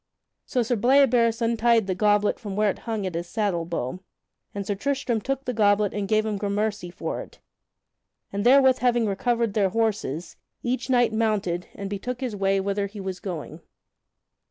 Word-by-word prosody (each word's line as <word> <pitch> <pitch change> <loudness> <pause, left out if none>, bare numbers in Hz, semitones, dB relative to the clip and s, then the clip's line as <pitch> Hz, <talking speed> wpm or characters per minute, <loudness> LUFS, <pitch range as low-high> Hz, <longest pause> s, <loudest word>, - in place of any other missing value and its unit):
So 250 - +1
Sir 240 +2 0
Bleoberis 240 -1 +3
untied 230 -1 +3
the 190 - -1
goblet 205 +2 +2
from 205 -3 -6
where 210 0 +3
it - - -10
hung 215 -3 -1
at 185 - -3
his 170 +1 -4
saddle 190 -4 -1
bow, 165 -1 -3 0.5
and 200 -1 -5
Sir 205 - -1
Tristram 250 0 -1
took 270 +3 -3
the 250 - -2
goblet 205 -2 +3
and 205 -1 -2
gave 215 +1 +2
him 215 -2 -1
gramercy 205 -1 -1
for 175 - -4
it; - - -13 1.0
and 200 0 -1
therewith 260 +1 +6
having 240 -2 +2
recovered 230 +2 0
their 200 -2 +2
horses, 205 -7 -2 0.3
each 255 +2 -2
knight 245 -3 +3
mounted, 210 -6 0
and 200 - -5
betook 220 +5 -4
his 250 -5 -3
way 195 0 +1
whither 200 +1 -1
he 205 +1 -10
was 190 -2 -5
going. 165 -3 -6
210 Hz, 180 wpm, -25 LUFS, 195-235 Hz, 1.0 s, therewith